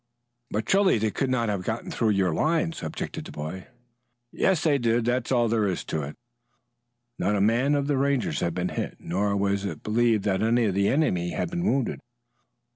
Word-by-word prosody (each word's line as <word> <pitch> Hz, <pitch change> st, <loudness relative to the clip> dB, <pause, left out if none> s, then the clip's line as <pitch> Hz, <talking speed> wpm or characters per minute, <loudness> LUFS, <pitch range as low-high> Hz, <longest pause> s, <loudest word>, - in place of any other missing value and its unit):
"But 110 Hz, +2 st, -2 dB
surely 195 Hz, -, +4 dB
they 110 Hz, 0 st, 0 dB
could 135 Hz, -, -1 dB
not 125 Hz, -3 st, +1 dB
have 100 Hz, -3 st, -2 dB
got 110 Hz, +4 st, -3 dB
through 115 Hz, -, +1 dB
your 95 Hz, -4 st, +2 dB
lines," 165 Hz, -, 0 dB
objected 80 Hz, -, -5 dB
the -, -, -9 dB
boy. 80 Hz, +5 st, -6 dB, 0.6 s
"Yet 190 Hz, -1 st, +2 dB
they 150 Hz, -2 st, +2 dB
did. 115 Hz, -1 st, +1 dB
That's 125 Hz, +1 st, 0 dB
all 120 Hz, -2 st, +3 dB
there 110 Hz, -2 st, +1 dB
is 95 Hz, -, -2 dB
to 80 Hz, -, -3 dB
it." 70 Hz, +1 st, -6 dB, 1.0 s
Not 105 Hz, +3 st, +1 dB
a -, -, +1 dB
man 120 Hz, +8 st, +3 dB
of 140 Hz, -1 st, 0 dB
the 145 Hz, -1 st, 0 dB
Rangers 140 Hz, -6 st, 0 dB
had 85 Hz, -1 st, -1 dB
been 90 Hz, 0 st, -1 dB
hit, -, -, -4 dB
nor 100 Hz, +4 st, -1 dB
was 100 Hz, 0 st, 0 dB
it 100 Hz, -, -5 dB
believed 110 Hz, -1 st, +2 dB
that 95 Hz, -2 st, 0 dB
any 115 Hz, +2 st, +3 dB
of 100 Hz, -, +1 dB
the 100 Hz, +1 st, +2 dB
enemy 90 Hz, -, +1 dB
had 80 Hz, -, -2 dB
been 175 Hz, 0 st, -2 dB
wounded. 135 Hz, -, 0 dB
110 Hz, 200 wpm, -26 LUFS, 95-135 Hz, 1.0 s, surely